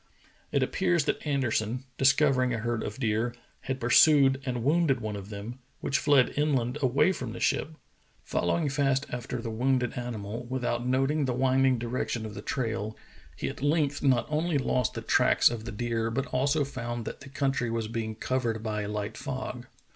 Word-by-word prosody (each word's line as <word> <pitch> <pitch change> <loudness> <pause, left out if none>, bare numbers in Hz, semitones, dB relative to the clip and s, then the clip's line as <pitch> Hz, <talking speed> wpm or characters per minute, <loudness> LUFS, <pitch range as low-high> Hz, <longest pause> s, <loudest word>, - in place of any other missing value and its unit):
It - - +2
appears 175 -5 +1
that - - -1
Anderson, 125 -3 0 0.2
discovering 135 -2 +3
a - - -2
herd 115 0 -2
of 105 - -5
deer, 115 0 0 0.2
had 130 0 -4
pursued 135 +2 +5
and 125 -2 -2
wounded 150 -2 +3
one 110 -2 -4
of 100 0 -8
them, 110 +5 -7 0.2
which 135 -2 0
fled 140 -3 +4
inland 140 -3 0
away 135 +7 +3
from 125 -10 -5
the - - -7
ship. 150 +6 0 0.5
Following 150 - 0
fast 135 -1 +1
after 125 -1 -4
the 115 - -3
wounded 125 +1 +1
animal, 115 -1 -5
without 125 -1 -2
noting 135 +3 +1
the 125 -2 -1
winding 130 0 +3
direction 120 -1 -2
of 110 - -7
the 100 - -7
trail, 115 -3 -3 0.4
he - - -3
at - - -6
length 145 -1 +1
not 130 -4 +3
only 155 +1 0
lost 125 -2 0
the - - -3
tracks - - +4
of 115 -2 -5
the 120 - -5
deer 115 +1 -1
but 130 +4 -1
also 140 +3 +2
found 120 -4 -5
that - - -6
the 140 - -11
country 135 -3 0
was 115 -1 -2
being 110 -1 -3
covered 115 -2 -1
by 105 -1 -2
a 105 - -4
Hght 105 -1 -4
fog. - - -5
125 Hz, 185 wpm, -28 LUFS, 115-135 Hz, 0.5 s, pursued